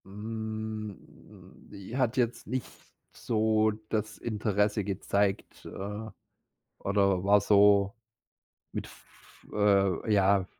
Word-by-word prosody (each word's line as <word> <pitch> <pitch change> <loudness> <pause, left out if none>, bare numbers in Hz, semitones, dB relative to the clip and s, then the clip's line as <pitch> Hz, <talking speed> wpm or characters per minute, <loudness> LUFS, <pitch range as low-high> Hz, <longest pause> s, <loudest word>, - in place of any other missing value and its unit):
Hm, 110 0 -5 0.7
j 100 +3 -9
hat 130 -2 +1
jetzt 120 -2 0
nicht 130 -3 -2 0.5
so 110 -1 +1 0.2
das 110 -1 -2
Interesse 105 -1 0
gezeigt, 100 0 -1
äh, 105 +3 -6 0.7
oder 100 -2 +1
war 100 +1 +5
so 100 0 +5 0.8
mit - - -4
f - - -19
äh, 100 -1 +2
ja, 100 -1 +3
105 Hz, 95 wpm, -29 LUFS, 100-110 Hz, 0.8 s, war